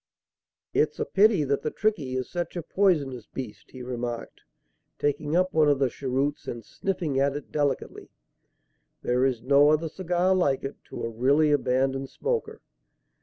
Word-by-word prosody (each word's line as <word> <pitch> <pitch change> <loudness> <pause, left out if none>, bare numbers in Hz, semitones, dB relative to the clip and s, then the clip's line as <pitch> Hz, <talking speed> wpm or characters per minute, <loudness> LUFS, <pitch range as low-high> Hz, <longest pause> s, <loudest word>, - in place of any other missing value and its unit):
"It's - - +2
a - - 0
pity 205 -5 +4
that 140 0 0
the 155 - -1
'Trichy' 155 -10 -1
is 130 - -3
such 175 -1 -4
a 175 - -3
poisonous 150 - +1
beast," 125 -6 -8
he 130 -1 -9
remarked, 120 -1 -5 0.6
taking 145 +2 -1
up 185 +1 +2
one 155 -2 +4
of 145 - +3
the 135 -2 +1
cheroots 135 +2 -2
and 115 -2 -5
sniffing 165 - -2
at 140 0 +2
it 145 - -7
delicately. 145 -3 -2 0.9
"There 125 +1 +1
is 125 -4 -1
no 140 +2 +5
other 155 +1 +2
cigar 180 +2 +1
like 145 -8 +1
it, 135 - -5
to - - -7
a - - 0
really 140 +7 +3
abandoned 135 -1 +1
smoker." 470 -1 -3
140 Hz, 165 wpm, -26 LUFS, 130-165 Hz, 0.9 s, no